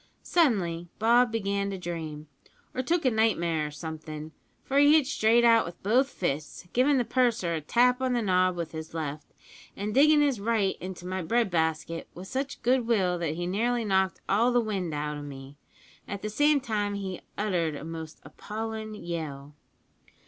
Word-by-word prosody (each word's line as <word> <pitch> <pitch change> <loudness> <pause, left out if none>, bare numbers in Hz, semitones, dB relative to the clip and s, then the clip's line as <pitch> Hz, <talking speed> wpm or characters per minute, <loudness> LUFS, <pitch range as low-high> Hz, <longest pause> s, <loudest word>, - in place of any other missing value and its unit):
Suddenly 185 - +1
Bob 240 +2 +4
began 200 -2 -1
to 195 - -4
dream, 160 -4 -5 0.5
or 255 - -1
took 330 +4 0
a 255 - +4
nightmare 170 -9 +1
or - - -6
somethin', 155 0 -7 0.3
for 275 +1 +1
he 290 +1 +7
hit 310 -3 +5
straight 235 -2 +3
out 230 -1 +6
with 170 - -10
both 250 +7 +3
fists, 155 - -4
givin' 270 +3 +4
the 245 - +1
purser 235 -10 +1
a 160 - -2
tap 250 - +3
on 260 -1 +1
the 240 - +1
nob 185 -2 +2
with 170 -2 -4
his 160 0 -7
left, 150 -2 -4 0.5
an' 205 +2 -3
diggin' 295 +5 +5
his 280 -6 +2
right 210 -2 +1
into 185 -1 -7
my 185 +1 -3
bread 225 +5 +1
basket 165 0 -1
with 185 +2 -8
such 270 +6 -4
good 245 -1 +2
will 185 -6 +2
that 160 -2 -2
he 175 +1 -3
nearly 230 +6 0
knocked 190 -2 +1
all 230 +5 +3
the 245 - +3
wind 200 -7 -2
out 150 0 -3
o' - - -7
me, 140 -1 -9 0.5
at 200 -1 -6
the 215 - -3
same 290 +5 +3
time 210 -5 -2
he 190 -2 -5 0.2
uttered 175 -7 0
a - - -7
most 160 -1 -7
appallin' 220 0 -6
yell. 155 -6 -6
195 Hz, 185 wpm, -28 LUFS, 165-235 Hz, 0.5 s, he